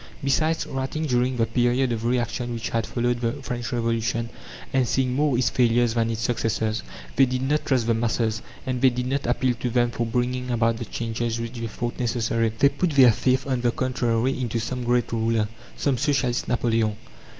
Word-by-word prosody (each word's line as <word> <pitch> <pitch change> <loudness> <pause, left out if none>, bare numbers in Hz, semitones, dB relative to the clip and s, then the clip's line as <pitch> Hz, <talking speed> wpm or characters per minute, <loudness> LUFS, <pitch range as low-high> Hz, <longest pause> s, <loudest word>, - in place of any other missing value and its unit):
Besides, 155 +4 +1
writing 135 +4 -3
during 125 -2 +1
the 115 - +3
period 120 +2 +1
of 115 -1 -2
reaction 120 0 -1
which 115 0 -4
had 115 -1 -1
followed 120 0 -1
the 115 -1 0
French 120 -2 -4
Revolution, 115 0 -1 0.4
and 130 -2 +2
seeing 125 +1 +1
more 145 -1 +2
its 120 -1 +2
failures 120 -1 +3
than 115 -1 +1
its 115 -1 -3
successes, 110 -2 0 0.4
they 135 0 +6
did 130 +1 -2
not 150 +3 0
trust 130 -4 +2
the 115 - +2
masses, 115 -1 0 0.2
and 130 -1 -2
they 135 - +7
did 125 0 -3
not 135 +1 -1
appeal 125 +1 +2
to 125 - -1
them 120 0 +2
for 115 0 -2
bringing 125 +2 -1
about 115 -1 +1
the 115 - -5
changes 115 0 -3
which 115 +1 -4
they 115 - -3
thought 120 +2 -4
necessary. 115 -2 0
They 140 +3 +5
put 145 +6 -1
their 130 -4 +7
faith, 130 +4 +1
on 130 -3 -1
the 120 - +2
contrary, 125 0 0
into 120 -2 -1
some 125 +3 -3
great 120 0 +1
ruler, 115 -1 +1 0.3
some 135 -4 0
Socialist 135 -3 0
Napoleon. 115 -3 +1
120 Hz, 195 wpm, -24 LUFS, 115-130 Hz, 0.4 s, they